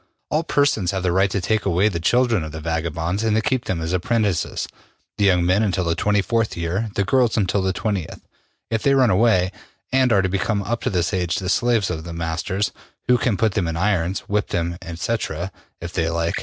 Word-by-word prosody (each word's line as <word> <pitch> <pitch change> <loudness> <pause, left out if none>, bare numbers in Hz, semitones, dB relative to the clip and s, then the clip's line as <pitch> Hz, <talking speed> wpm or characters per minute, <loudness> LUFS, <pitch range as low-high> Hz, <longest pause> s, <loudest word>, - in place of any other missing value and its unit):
All 155 - +2
persons 140 - +1
have 95 -1 -2
the 90 - +1
right 95 +2 +3
to 100 - -1
take 105 +5 0
away 95 +2 +2
the 90 -6 -1
children 120 +1 +2
of 80 - -6
the 80 - -6
vagabonds 80 +4 -2
and 110 -1 +2
to 110 - +3
keep 130 -4 0
them 90 - -2
as 80 +2 -2
apprentices, 100 - 0 0.5
the 100 - +3
young 90 -3 +3
men 90 +4 +3
until 95 -3 +1
the 85 -1 0
24th 105 +4 +1
year, 90 +6 -2
the 100 - +2
girls 120 +3 +2
until 100 -1 +1
the 95 0 +1
20th. 100 -4 -3 0.5
If 110 -1 0
they 140 0 +3
run 130 -5 +4
away, 95 -2 +3 0.4
they 130 +1 +3
are 100 -4 +3
to - - +2
become 100 +2 -1
up 115 +4 -2
to - - 0
this 90 -3 0
age 90 -2 0
the 90 - -3
slaves 115 -2 +2
of 80 -2 -4
their 85 0 -7
masters, 85 +4 -2 0.4
who 125 0 +4
can 115 -5 +1
put 110 +1 +2
them 95 -5 0
in 80 0 -2
irons, 95 -1 0
whip 105 0 -1
them, 85 0 -2 0.2
&c., 95 +7 -1 0.6
if 85 +1 -7
they 80 -2 0
like. 85 0 -1
95 Hz, 220 wpm, -22 LUFS, 85-110 Hz, 0.6 s, run